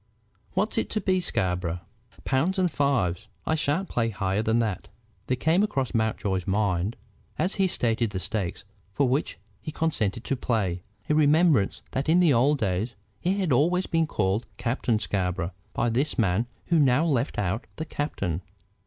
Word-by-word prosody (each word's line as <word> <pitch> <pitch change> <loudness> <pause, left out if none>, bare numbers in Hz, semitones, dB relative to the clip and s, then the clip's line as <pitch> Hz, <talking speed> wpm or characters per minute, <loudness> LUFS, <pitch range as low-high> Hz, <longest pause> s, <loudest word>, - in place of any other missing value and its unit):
What's - - +1
it - - -2
to 215 - -1
be, 185 -2 +1
Scarborough?" 90 - -1 0.4
"Pounds 160 +9 +1
and 180 -2 +2
fives. 120 -13 0 0.2
I - - +1
shan't 160 +4 0
play 115 -1 0
higher 100 -1 -1
than 110 +1 +1
that." 110 -5 -1 0.4
There 125 - +1
came 165 +7 +3
across 135 - 0
Mountjoy's 105 -4 0
mind, 100 0 +1 0.4
as 185 - +1
he 190 - +4
stated 115 - +1
the 95 -2 -4
stakes 95 -2 -3 0.3
for 140 +4 +2
which 135 +4 0 0.2
he 155 - -5
consented 115 -10 -1
to 135 - -1
play, 100 -9 -1 0.3
a - - +2
remembrance 150 - +3
that 135 +4 -1
in 170 +3 +5
the 170 -5 +5
old 135 +5 +4
days 105 +1 -1 0.2
he 190 +3 0
had 185 -6 0
always 175 +8 +3
been 165 -2 +1
called 105 -3 0
Captain 120 -1 0
Scarborough 90 -3 -1 0.2
by 120 - 0
this 130 +6 0
man 110 0 +2 0.2
who 170 -2 +4
now 140 +2 +4
left 135 -8 0
out 105 +4 -1
the 160 - -4
captain. 100 - -3
120 Hz, 170 wpm, -26 LUFS, 100-155 Hz, 0.4 s, in